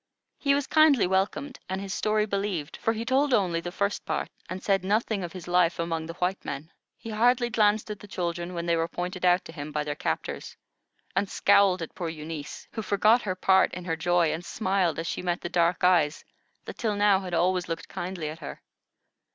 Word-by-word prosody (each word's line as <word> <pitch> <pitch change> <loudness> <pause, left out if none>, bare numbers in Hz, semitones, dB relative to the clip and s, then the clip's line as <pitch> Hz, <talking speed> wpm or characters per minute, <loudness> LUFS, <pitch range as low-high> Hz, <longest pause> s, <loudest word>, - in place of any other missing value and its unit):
He 280 -1 +3
was 285 -1 0
kindly 310 -6 +5
welcomed, 195 +9 -1
and 190 +1 -2
his 195 -1 -5
story 215 0 +1
believed; 195 -7 -2
for 225 - 0
he 225 +1 -4
told 265 +1 +3
only 175 -5 +1
the 175 - -5
first 200 +2 -1
part, - - -2 0.2
and 185 0 -5
said 195 -2 +2
nothing 210 0 0
of 175 - -5
his 180 -1 -9
life 175 -1 +3
among 165 -1 -2
the 165 - -7
white 185 +2 -1
men. 145 +3 -6 0.3
He 225 - -8
hardly 240 +2 +3
glanced 215 0 +2
at 210 - -6
the 210 - -12
children 175 -1 -3
when 170 0 -3
they 170 -1 +2
were 165 0 0
pointed 180 +2 -4
out 180 0 +4
to - - -9
him 150 -2 -7
by 150 0 -1
their 150 0 -3
captors, - - -4 0.6
and 195 +1 +1
scowled 195 -3 +4
at 160 - -8
poor 170 -2 -4
Eunice, 155 -2 -7
who 220 - -4
forgot 215 +4 +3
her 185 -4 -2
part 190 +1 +4
in 180 -1 -7
her 165 -3 -1
joy, 170 -1 +2
and 165 +2 -5
smiled 190 -4 0
as 165 - -3
she - - -3
met 175 -1 -1
the 175 - -4
dark 170 +1 +1
eyes 170 -5 +3 0.4
that - - -8
till 215 -3 0
now 205 -1 +4
had 180 -2 -4
always 180 0 +1
looked 165 0 -4
kindly 175 -3 -4
at 155 +1 -8
her. - - -8
185 Hz, 215 wpm, -27 LUFS, 170-205 Hz, 0.6 s, kindly